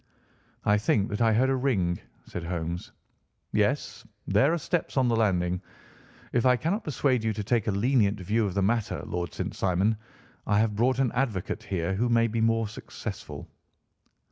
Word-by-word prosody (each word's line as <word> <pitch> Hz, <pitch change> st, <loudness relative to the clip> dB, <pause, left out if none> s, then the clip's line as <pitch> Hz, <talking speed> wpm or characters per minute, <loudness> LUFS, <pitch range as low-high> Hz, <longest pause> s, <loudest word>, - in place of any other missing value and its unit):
"I 105 Hz, 0 st, +4 dB
think 105 Hz, 0 st, +1 dB
that 105 Hz, +1 st, -3 dB
I 115 Hz, -1 st, +5 dB
heard 130 Hz, +4 st, +3 dB
a -, -, +2 dB
ring," 100 Hz, -10 st, +1 dB, 0.3 s
said 90 Hz, -, -6 dB
Holmes. 85 Hz, 0 st, -4 dB, 0.6 s
"Yes, -, -, 0 dB, 0.2 s
there 140 Hz, +4 st, +3 dB
are 170 Hz, -, +1 dB
steps 170 Hz, -1 st, -2 dB
on 130 Hz, -2 st, +4 dB
the 115 Hz, -, +2 dB
landing. 90 Hz, -5 st, +1 dB, 0.7 s
If 120 Hz, -, +2 dB
I 125 Hz, -1 st, +5 dB
cannot 185 Hz, -, -1 dB
persuade 130 Hz, -5 st, +1 dB
you 110 Hz, -1 st, +1 dB
to 105 Hz, -, -4 dB
take 115 Hz, 0 st, +1 dB
a -, -, +3 dB
lenient 105 Hz, 0 st, +2 dB
view 105 Hz, +4 st, +1 dB
of 95 Hz, -, -5 dB
the 100 Hz, -, +2 dB
matter, 110 Hz, +2 st, 0 dB
Lord 85 Hz, -1 st, -3 dB
St. -, -, -4 dB
Simon, 95 Hz, +4 st, +1 dB, 0.5 s
I 105 Hz, -, +3 dB
have 110 Hz, -1 st, +2 dB
brought 125 Hz, +4 st, +2 dB
an 130 Hz, -3 st, +2 dB
advocate 115 Hz, -8 st, -1 dB
here 90 Hz, 0 st, -2 dB
who 120 Hz, +5 st, 0 dB
may 115 Hz, -1 st, +4 dB
be 115 Hz, 0 st, -1 dB
more 115 Hz, 0 st, +2 dB
successful." 105 Hz, -, -7 dB
110 Hz, 180 wpm, -27 LUFS, 95-125 Hz, 0.7 s, I